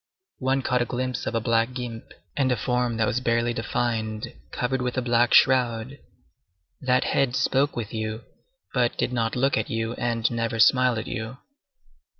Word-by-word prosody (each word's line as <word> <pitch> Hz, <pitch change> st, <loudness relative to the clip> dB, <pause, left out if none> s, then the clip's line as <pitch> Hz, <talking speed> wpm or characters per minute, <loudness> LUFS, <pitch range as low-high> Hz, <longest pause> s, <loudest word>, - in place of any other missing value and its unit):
One 130 Hz, 0 st, 0 dB
caught 125 Hz, -1 st, +1 dB
a -, -, +1 dB
glimpse 125 Hz, +1 st, -3 dB
of 115 Hz, -, -2 dB
a -, -, +3 dB
black 115 Hz, +1 st, +1 dB
guimpe, 120 Hz, -3 st, -6 dB, 0.2 s
and 135 Hz, -2 st, +1 dB
a -, -, +3 dB
form 125 Hz, +1 st, 0 dB
that 115 Hz, -, +2 dB
was 115 Hz, -, 0 dB
barely 120 Hz, -1 st, +1 dB
defined, 110 Hz, -1 st, -2 dB, 0.2 s
covered 125 Hz, +1 st, -1 dB
with 125 Hz, 0 st, -2 dB
a -, -, +2 dB
black 120 Hz, 0 st, +3 dB
shroud. 125 Hz, 0 st, +3 dB, 0.8 s
That 125 Hz, -2 st, +2 dB
head 130 Hz, -3 st, +1 dB
spoke 135 Hz, +2 st, +1 dB
with 115 Hz, -3 st, -5 dB
you, 110 Hz, 0 st, -4 dB, 0.5 s
but 120 Hz, -2 st, +1 dB
did 125 Hz, -, -1 dB
not 115 Hz, -2 st, 0 dB
look 135 Hz, +2 st, +2 dB
at -, -, -3 dB
you 115 Hz, -1 st, -2 dB
and 115 Hz, -1 st, 0 dB
never 115 Hz, -1 st, -2 dB
smiled 125 Hz, +2 st, +4 dB
at 110 Hz, -, -3 dB
you. 115 Hz, +1 st, -5 dB
120 Hz, 175 wpm, -25 LUFS, 115-125 Hz, 0.8 s, smiled